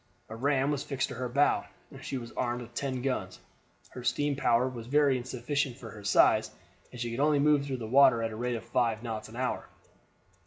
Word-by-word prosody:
A 110 Hz, -, -6 dB
ram 135 Hz, +3 st, +1 dB
was 145 Hz, -2 st, -1 dB
fixed 135 Hz, -2 st, -2 dB
to -, -, -5 dB
her 125 Hz, 0 st, -4 dB
bow, 140 Hz, +4 st, +2 dB, 0.3 s
and -, -, -11 dB
she 135 Hz, -, -3 dB
was 120 Hz, -2 st, -7 dB
armed 120 Hz, 0 st, -2 dB
with 120 Hz, 0 st, -14 dB
ten 130 Hz, -1 st, -3 dB
guns. 130 Hz, -, -2 dB, 0.5 s
Her 125 Hz, -, -8 dB
steam 145 Hz, +3 st, 0 dB
power 125 Hz, -2 st, +2 dB
was 120 Hz, -3 st, -7 dB
very 145 Hz, 0 st, +3 dB
insufficient 130 Hz, +1 st, -2 dB
for 115 Hz, -5 st, -9 dB
her 105 Hz, -1 st, -11 dB
size, 100 Hz, -, +4 dB, 0.4 s
and 125 Hz, -, -10 dB
she 120 Hz, -1 st, -3 dB
could 115 Hz, -, -4 dB
only 150 Hz, +1 st, +3 dB
move 145 Hz, 0 st, +3 dB
through 135 Hz, -2 st, -2 dB
the 115 Hz, -, -6 dB
water 125 Hz, -1 st, +5 dB
at 115 Hz, -, -2 dB
the -, -, -6 dB
rate 120 Hz, +2 st, -2 dB
of 115 Hz, -, -6 dB
five 115 Hz, -2 st, 0 dB
knots 110 Hz, -2 st, -5 dB
an 110 Hz, -, -12 dB
hour. 130 Hz, +1 st, -2 dB
125 Hz, 225 wpm, -29 LUFS, 115-140 Hz, 0.5 s, water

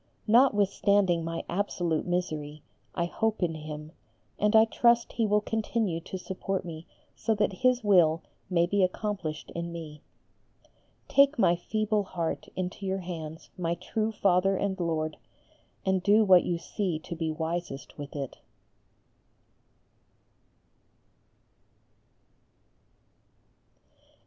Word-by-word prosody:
Notwithstanding 205 Hz, -6 st, +3 dB
my 165 Hz, 0 st, -3 dB
absolute 175 Hz, -4 st, -1 dB
misery 155 Hz, -4 st, -3 dB, 0.3 s
I 170 Hz, -, +1 dB
hope 220 Hz, +3 st, -1 dB
in 165 Hz, -2 st, +1 dB
Him, 155 Hz, 0 st, -7 dB, 0.5 s
and 210 Hz, +1 st, +3 dB
I 220 Hz, 0 st, +8 dB
trust 235 Hz, +1 st, +3 dB
He 225 Hz, -2 st, +1 dB
will 210 Hz, 0 st, +3 dB
continue 220 Hz, -5 st, -1 dB
to 180 Hz, +3 st, -7 dB
support 190 Hz, 0 st, -3 dB
me 165 Hz, -1 st, -8 dB, 0.3 s
so 220 Hz, 0 st, 0 dB
that 210 Hz, -1 st, +1 dB
His 255 Hz, -1 st, +3 dB
will 175 Hz, -5 st, +4 dB, 0.3 s
may 170 Hz, -2 st, +3 dB
be 200 Hz, +3 st, +1 dB
accomplished 185 Hz, -4 st, -3 dB
in 170 Hz, 0 st, -4 dB
me. 155 Hz, -3 st, -8 dB, 1.1 s
Take 280 Hz, +1 st, +4 dB
my 175 Hz, -6 st, +4 dB
feeble 215 Hz, +4 st, 0 dB
heart 170 Hz, -4 st, -3 dB
into 185 Hz, +2 st, -4 dB
your 190 Hz, 0 st, -1 dB
hands, 160 Hz, -3 st, -7 dB
my 170 Hz, -1 st, 0 dB
true 215 Hz, +5 st, -2 dB
Father 195 Hz, -2 st, +2 dB
and 195 Hz, -1 st, -2 dB
Lord, 160 Hz, -2 st, -1 dB, 0.7 s
and 190 Hz, -1 st, +2 dB
do 210 Hz, +3 st, +5 dB
what 185 Hz, -3 st, +7 dB
you 175 Hz, -, 0 dB
see 180 Hz, 0 st, -2 dB
to 170 Hz, +2 st, -7 dB
be 160 Hz, -1 st, -2 dB
wisest 160 Hz, -2 st, -4 dB
with 145 Hz, 0 st, -7 dB
it. 140 Hz, -3 st, -5 dB
180 Hz, 120 wpm, -28 LUFS, 165-210 Hz, 1.1 s, I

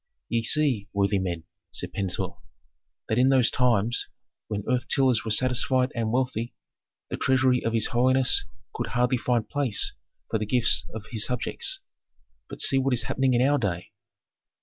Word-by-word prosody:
"Ye 115 Hz, -, 0 dB
see, 125 Hz, -4 st, +2 dB
worthy 100 Hz, 0 st, +1 dB
men," 85 Hz, -3 st, -3 dB, 0.3 s
said -, -, -3 dB
Pentuer, 95 Hz, -3 st, -3 dB, 0.8 s
"that 110 Hz, -, 0 dB
in 130 Hz, +1 st, +4 dB
those 130 Hz, -3 st, +3 dB
times, 120 Hz, -2 st, +1 dB, 0.4 s
when 105 Hz, -2 st, -4 dB
earth 125 Hz, 0 st, 0 dB
tillers 130 Hz, -6 st, +2 dB
were 110 Hz, -, -5 dB
satisfied 130 Hz, +2 st, +1 dB
and 115 Hz, -2 st, -2 dB
wealthy, 125 Hz, -2 st, -2 dB, 0.6 s
the -, -, -3 dB
treasury 130 Hz, -1 st, +2 dB
of 115 Hz, -, -1 dB
his 115 Hz, -1 st, +3 dB
holiness 130 Hz, +2 st, +3 dB, 0.3 s
could -, -, -4 dB
hardly 125 Hz, +1 st, 0 dB
find 120 Hz, -3 st, 0 dB
place 135 Hz, -6 st, +1 dB, 0.3 s
for 110 Hz, -, -1 dB
the 105 Hz, -, -3 dB
gifts 120 Hz, +1 st, +3 dB
of 110 Hz, -1 st, -7 dB
his 110 Hz, -3 st, 0 dB
subjects. 125 Hz, -1 st, -2 dB, 0.7 s
But -, -, -7 dB
see 135 Hz, -, +5 dB
what 135 Hz, -1 st, +1 dB
is 115 Hz, -, 0 dB
happening 130 Hz, 0 st, 0 dB
in 125 Hz, +2 st, +3 dB
our 145 Hz, 0 st, +2 dB
day." 90 Hz, -6 st, -3 dB
120 Hz, 165 wpm, -25 LUFS, 110-130 Hz, 0.8 s, see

